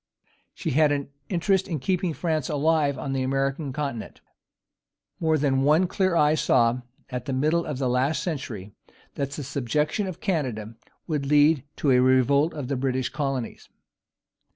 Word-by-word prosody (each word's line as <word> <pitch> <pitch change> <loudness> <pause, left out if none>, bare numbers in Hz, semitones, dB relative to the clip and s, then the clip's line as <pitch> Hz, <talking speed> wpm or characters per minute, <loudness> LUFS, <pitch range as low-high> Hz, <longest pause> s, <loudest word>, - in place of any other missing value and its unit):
She - - -3
had 150 +2 +4
an 140 -1 -2 0.2
interest 190 +1 +1
in 165 -5 -2
keeping 180 +4 0
France 160 -5 -1
alive 150 -1 +2
on 135 +1 -4
the 135 - 0
American 135 +2 -1
continent. 140 -5 -5 1.0
More 160 -1 +2
than 135 -2 +1
one 155 +6 +4
clear 185 0 0
eye 150 -2 +4
saw, 120 -5 +2 0.3
at 125 -1 -4
the 135 - -3
middle 155 +6 +1
of 150 -4 -3
the 130 -1 0
last 135 +4 +1
century, 120 - -5 0.4
that 140 -1 -2
the 145 +1 -6
subjection 150 - -1
of 185 - -6
Canada 130 - -2 0.3
would 150 -4 -2
lead 145 -1 +4
to 140 - +1
a 125 - +5
revolt 130 +4 +4
of 145 -5 -4
the 140 - -1
British 130 -1 -1
colonies. 135 -4 -4
140 Hz, 160 wpm, -25 LUFS, 130-155 Hz, 1.0 s, a